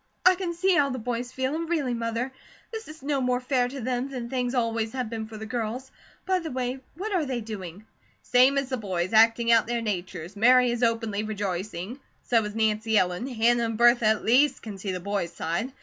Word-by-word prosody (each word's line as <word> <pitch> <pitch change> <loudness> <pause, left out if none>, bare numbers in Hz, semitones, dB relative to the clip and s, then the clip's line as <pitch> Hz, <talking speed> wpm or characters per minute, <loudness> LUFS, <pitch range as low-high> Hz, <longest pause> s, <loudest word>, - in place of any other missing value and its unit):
I 370 - +8
can 355 -2 -4
see 375 +2 +2
how 285 -5 +3
the 255 - -3
boys 245 +1 -3
feel, 260 +2 -2
and 330 +1 -3
really, 290 -8 0
Mother, 230 +2 -2 0.4
this 445 -1 -6
is 310 -2 -12
no 280 -1 0
more 250 -1 +1
fair 250 -1 +1
to 270 +2 -7
them 250 +2 -2
than 245 -3 -5
things 250 -1 -1
always 230 -2 0
have 250 -4 -3
been 220 -1 -4
for 220 -1 -9
the 220 - -6
girls. 240 +3 -4 0.3
By 375 -1 +2
the 330 -2 -5
way, 255 0 -3 0.2
what 405 +5 -4
are 355 -4 +2
they 260 -4 -2
doing?" 205 -3 -7 0.4
"Same 255 +3 +4
as 275 -1 -1
the 260 - -1
boys, 185 -3 -2
acting 230 +1 +5
out 230 -1 +5
their 240 0 -1
natures. 185 -3 -4
Mary 250 +3 +5
is 240 0 -3
openly 225 -3 0
rejoicing. 205 +1 -4 0.2
So 230 -2 +2
is 210 0 -5
Nancy 220 0 +1
Ellen. 180 +5 +1
Hannah 235 -1 +2
and 225 -1 -3
Bertha 240 -1 +5
at 220 0 +2
least 265 +6 +3
can 205 -3 -7
see 195 0 -3
the 180 - -3
boys' 190 -2 -3
side. 170 +11 -2
235 Hz, 220 wpm, -26 LUFS, 215-260 Hz, 0.4 s, I